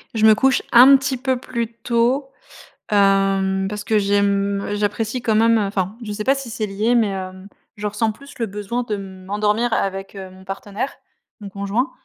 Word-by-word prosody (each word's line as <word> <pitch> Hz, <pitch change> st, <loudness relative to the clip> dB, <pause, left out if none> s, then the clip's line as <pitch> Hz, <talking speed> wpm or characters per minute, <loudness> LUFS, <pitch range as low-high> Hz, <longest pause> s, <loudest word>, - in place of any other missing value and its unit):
Je 220 Hz, 0 st, +3 dB
me 215 Hz, -, +7 dB
couche 265 Hz, +3 st, +2 dB
un 260 Hz, +3 st, +9 dB
petit 265 Hz, -1 st, 0 dB
peu 260 Hz, 0 st, -1 dB
plus 235 Hz, -2 st, -4 dB
tôt. 240 Hz, +4 st, 0 dB, 0.6 s
Hem, 195 Hz, -1 st, +2 dB
parce 210 Hz, -1 st, -5 dB
que 220 Hz, -, +1 dB
j'aime, 200 Hz, 0 st, +1 dB
j'apprécie 210 Hz, +3 st, -2 dB
quand 220 Hz, -2 st, +1 dB
même, 230 Hz, +1 st, +4 dB
heu, -, -, +1 dB
enfin, 195 Hz, 0 st, -2 dB
je 210 Hz, -, -5 dB
sais 210 Hz, +1 st, -4 dB
pas 270 Hz, -, +3 dB
si 270 Hz, -3 st, -6 dB
c'est 215 Hz, -1 st, -3 dB
lié, 210 Hz, +4 st, 0 dB
mais, 225 Hz, -4 st, +3 dB
hem, 185 Hz, 0 st, -6 dB, 0.3 s
je 210 Hz, 0 st, -7 dB
ressens 215 Hz, +2 st, 0 dB
plus 280 Hz, +6 st, -14 dB
le 230 Hz, -, 0 dB
besoin 210 Hz, +5 st, -3 dB
de 210 Hz, -3 st, -3 dB
m'endormir 205 Hz, +4 st, -2 dB
avec, 195 Hz, +1 st, -2 dB
heu, 190 Hz, -1 st, -8 dB
mon 190 Hz, 0 st, -15 dB
partenaire, 200 Hz, +6 st, -5 dB, 0.5 s
mon 200 Hz, -1 st, -8 dB
conjoint, 200 Hz, +8 st, -2 dB
210 Hz, 190 wpm, -20 LUFS, 195-235 Hz, 0.6 s, un